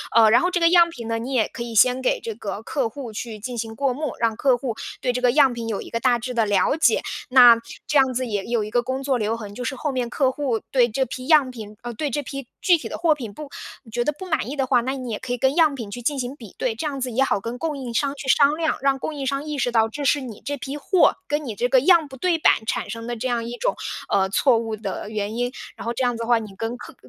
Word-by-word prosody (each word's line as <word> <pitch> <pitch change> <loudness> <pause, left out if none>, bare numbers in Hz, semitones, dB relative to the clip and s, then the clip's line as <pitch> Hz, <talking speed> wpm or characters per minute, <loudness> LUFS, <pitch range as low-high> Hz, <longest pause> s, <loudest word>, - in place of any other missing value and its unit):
呃， 220 -2 +7
然 235 - +6
后 360 - +2
这 360 - 0
个 335 - +6
样 340 -1 +6
品 240 -9 -8
呢， 225 0 -1
你 250 +4 -5
也 230 -4 +2
可 240 - -9
以 235 -1 -5
先 250 +4 +5
给 255 - +1
这 225 - -4
个 205 -1 -6
客 265 -1 -1
户 245 -1 -8
去 220 0 -5
进 240 +3 -6
行 225 -1 -4
过 270 0 0
目， 300 +3 -3
让 230 -2 +1
客 260 -3 +3
户 245 -2 -4 0.3
对 250 - +1
这 250 - -2
个 245 -1 +4
样 275 -3 +5
品 235 -1 -5
有 215 -3 -2
一 - - -9
个 230 - -2
大 245 0 +3
致 250 +2 -5
地 230 -2 +2
了 205 +5 +2
解。 320 - +3 0.3
那 245 -2 +8 0.3
这 295 -2 +3
样 265 -1 +3
子 255 +1 -1
也 205 -4 -3
有 235 -2 0
一 210 - -7
个 240 - +2
工 260 +2 -3
作 270 -2 +1
留 220 +1 0
痕， 210 -3 -8
就 245 - -6
是 265 - -2
后 290 +2 -2
面 250 -2 -2
客 265 +1 +1
户 260 -6 -2
对 245 -3 +4
这 260 +4 0
批 255 +2 -7
样 295 -5 +5
品 215 -4 -9
呃， 240 -1 -5
对 290 +6 -2
这 290 +2 -2
批 275 -1 -7
具 355 -3 +5
体 - - -7
的 - - -5
货 330 -2 +3
品 240 -8 -7
不 295 +5 -9 0.3
你 225 - -16
觉 240 +1 0
得 300 - +2
不 375 - -7
满 310 -7 -1
意 290 - -4
的 270 - 0
话， 245 -2 +3
那 260 +3 -2
你 255 -3 -5
也 210 - -3
可 260 -1 -6
以 245 - -2
跟 265 +4 +1
样 315 -4 +4
品 225 -6 -7
去 245 - -6
进 280 +4 -1
行 255 +2 -4
比 225 -8 -13
对， 245 -3 -1
这 275 +7 -3
样 275 -2 -4
子 255 -1 -2
也 265 +4 +2
好 235 - +1
跟 230 +4 -5
供 310 -1 -2
应 250 -4 -6
商 280 +3 0
去 275 -1 -8
商 285 +2 +5
量， 320 -1 0
让 275 -1 +3
供 315 - -4
应 275 -2 -4
商 275 +2 -1
意 300 -1 -4
识 250 -2 0
到 225 -1 +3
这 285 +5 -5
是 285 +2 +3
你 235 -6 -8
这 285 - -2
批 275 +2 -5
货， 355 +4 +3
跟 295 +1 -1
你 235 - -4
这 245 +4 0
个 255 -1 +4
样 335 -1 +5
不 265 - -11
对 350 +3 +1
板 225 - +3
产 - - -2
生 230 +2 -6
的 240 - -3
这 255 - -2
样 240 -2 -1
一 240 +1 -6
种， - - 0 0.3
呃， 190 -1 +2
错 250 +4 +3
误 225 -1 -3
的 205 0 -5
原 215 0 -3
因。 245 +1 -1 0.2
然 - - -9
后 235 - -1
这 250 - -4
样 245 -1 +1
子 230 - -6
的 - - -5
话， 240 -1 +4
你 210 -3 -9
跟 225 +3 -4
客 - - -11
250 Hz, 330 characters per minute, -23 LUFS, 230-280 Hz, 0.3 s, 那